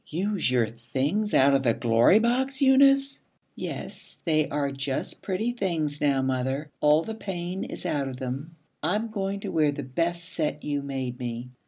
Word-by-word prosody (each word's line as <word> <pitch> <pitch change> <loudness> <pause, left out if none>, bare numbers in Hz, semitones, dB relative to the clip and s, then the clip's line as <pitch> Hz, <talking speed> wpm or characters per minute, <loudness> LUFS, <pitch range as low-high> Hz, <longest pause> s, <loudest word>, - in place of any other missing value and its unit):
'Use 190 0 0
your 125 -2 +3
things 135 - -2
out 140 +1 +6
of 135 0 +3
your 115 -3 +3
Glory 115 - +5
Box, 260 +4 +1
Eunice!' 275 0 +5 0.3
'Yes, - - -6
they 155 -3 +2
are 140 -1 -1
just 135 0 -3
pretty 210 +5 -1
things, 165 -10 -1
now, 140 -2 +2
mother. 130 +3 -1
All 150 +2 +4
the 220 - -5
pain 190 -2 -4
is - - -8
out 140 -3 0
of 130 -1 -6
them. 135 +6 -5 0.3
I'm 215 +5 0
going 200 -1 -2
to - - -4
wear 155 -2 +3
the 145 0 -5
best 165 +5 -2
set 150 -3 -2
you 145 -1 -1
made 130 -3 -4
me. 120 0 -5
150 Hz, 175 wpm, -26 LUFS, 135-195 Hz, 0.3 s, out